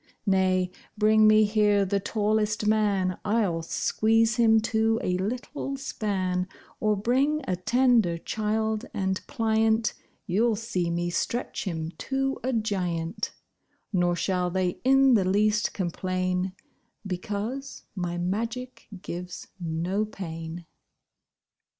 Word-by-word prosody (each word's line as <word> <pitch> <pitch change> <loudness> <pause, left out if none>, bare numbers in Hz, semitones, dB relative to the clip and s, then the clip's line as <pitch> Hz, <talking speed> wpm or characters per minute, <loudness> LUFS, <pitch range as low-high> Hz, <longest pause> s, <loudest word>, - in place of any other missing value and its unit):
Nay, 185 -2 +2 0.3
bring 215 0 +5
me 215 0 +6
here 210 -1 +3
the 200 +1 0
tallest 210 +1 0
man, 205 -4 +2
I'll 205 -6 +1
squeeze 225 +6 +1
him 225 -2 +5
to 225 0 +1
a 180 - +1
little 250 +6 -3
span; 190 -8 -2 0.3
Or 215 -1 +2
bring 265 +9 +1
a 185 - +1
tender 225 -2 +3
child, 220 +4 -1
and 190 -1 -1
pliant, 220 -2 +1 0.3
You'll 220 +4 +2
see 190 -5 -2
me 175 +1 -1
stretch 240 +7 -2
him 165 -3 -3
to 270 0 -1
a 260 - 0
giant: 185 -6 -2 0.6
Nor 175 -2 +2
shall 180 0 0
they 180 0 -1
in 270 0 +5
the 210 -5 +4
least 210 +3 +2
complain, 185 0 -2 0.5
Because 210 +8 -4
my 175 -2 -2
magic 230 +8 -3 0.2
gives 180 +1 -6
no 175 +5 -1
pain. 165 -4 -7
210 Hz, 115 wpm, -27 LUFS, 180-225 Hz, 0.6 s, me